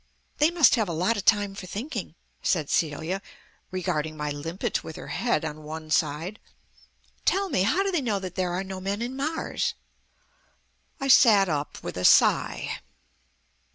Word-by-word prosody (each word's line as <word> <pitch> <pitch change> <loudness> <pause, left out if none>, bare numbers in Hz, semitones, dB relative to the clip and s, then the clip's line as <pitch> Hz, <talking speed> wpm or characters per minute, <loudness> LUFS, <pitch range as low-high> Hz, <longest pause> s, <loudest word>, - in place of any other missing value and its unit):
"They 300 +2 +5
must 335 -8 +5
have 215 -5 0
a - - -2
lot 180 +8 +1
of 205 - -4
time 205 -2 +3
for 195 -2 -8
thinking," 220 - -5 0.3
said 160 -6 0
Celia, 160 +4 0 0.5
regarding 160 -4 -2
my 150 0 -2
limpet 165 +5 -3
with 160 - -8
her - - -9
head 230 -10 0
on 155 0 -5
one 155 +1 -8
side. 160 +7 0 0.8
"Tell 390 0 +1
me, 185 - +1
how 310 - +2
do 395 - -1
they 345 -5 +1
know 220 -6 0
that 185 -2 -6
there 185 -2 -1
are 180 +2 -2
no 190 -1 -6
men 200 +4 -2
in 250 +2 -4
Mars?" 310 +4 -2 1.2
I 275 - -2
sat 210 -7 +6
up 145 -2 -3
with 90 - -5
a 90 - -3
sigh. - - +4
190 Hz, 170 wpm, -26 LUFS, 160-230 Hz, 1.2 s, sat